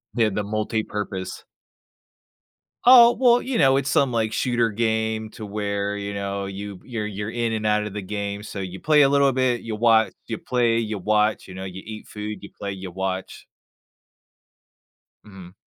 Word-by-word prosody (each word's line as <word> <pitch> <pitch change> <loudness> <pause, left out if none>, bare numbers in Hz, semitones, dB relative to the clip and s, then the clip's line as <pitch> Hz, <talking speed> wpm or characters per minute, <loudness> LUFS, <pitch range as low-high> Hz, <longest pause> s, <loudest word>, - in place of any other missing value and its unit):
Yeah, 115 -2 +3
the 105 +1 -2
multipurpose. 105 -3 -3 1.4
Oh, 240 -1 +8
well, 245 -2 +5
you 260 -2 -2
know, 135 -2 +5
it's 140 0 -1
some, 135 -2 +3
like, 110 -2 0
shooter 120 -2 +1
game 110 0 -1
to 110 -3 -8
where, 100 0 -2
you 100 0 -4
know, 100 0 -3
you 100 -1 -7
you're 115 -4 -4
you're 105 +1 -5
in 115 -1 -1
and 110 -1 -2
outta 105 0 +1
the 105 0 -5
game, 100 +1 -4
so 100 - -7
you 95 -1 -6
play 150 -1 +4
a 135 - +6
little 140 -1 +4
bit, 125 -2 +1
you 110 -1 -5
watch, 110 0 +3
you 110 - -3
play, 120 -2 +1
you 110 -2 -2
watch, 105 +2 +1
you 95 - -10
know, 95 +1 -6
you 95 0 -7
eat 110 -1 -8
food, 105 -2 -6
you 100 - -9
play, 100 -1 -4
you 95 -2 -7
watch. 95 0 -4 1.8
Mhm. 95 -3 -12
105 Hz, 175 wpm, -23 LUFS, 100-115 Hz, 1.8 s, Oh